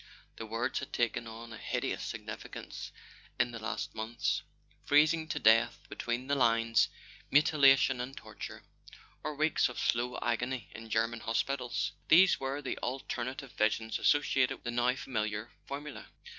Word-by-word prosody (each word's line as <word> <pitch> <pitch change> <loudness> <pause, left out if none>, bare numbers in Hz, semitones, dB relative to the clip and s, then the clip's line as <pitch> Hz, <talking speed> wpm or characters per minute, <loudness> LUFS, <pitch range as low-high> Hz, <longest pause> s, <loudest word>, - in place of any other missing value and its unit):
The 115 - -6
words 115 +3 -1
had - - -7
taken 120 -1 0
on 115 +1 -9
a 115 - -9
hideous - - -2
significance - - -7 0.5
in 120 - +2
the 115 - -6
last 110 0 -4
months. 110 +2 -1 0.4
Freezing 155 +2 +4
to - - -3
death 115 +2 +5
between 120 +2 -3
the 140 - -1
lines, 115 -3 +3 0.4
mutilation 140 -3 +5
and 130 +2 -6
torture, - - -8 0.6
or 155 -1 -3
weeks 155 -1 +2
of 125 - -9
slow 120 +1 0
agony 125 0 -2
in 115 0 -9
German 115 +1 0
hospitals: 125 +3 -1 0.2
these 180 +3 +6
were 135 +2 -3
the 130 - -3
alternative 130 +1 -4
visions 110 +1 0
associated 140 -3 +3
with - - -30
the 120 - -2
now 120 +1 +2
familiar 110 -3 -3 0.2
formula. 145 +1 -6
120 Hz, 145 wpm, -32 LUFS, 115-135 Hz, 0.6 s, these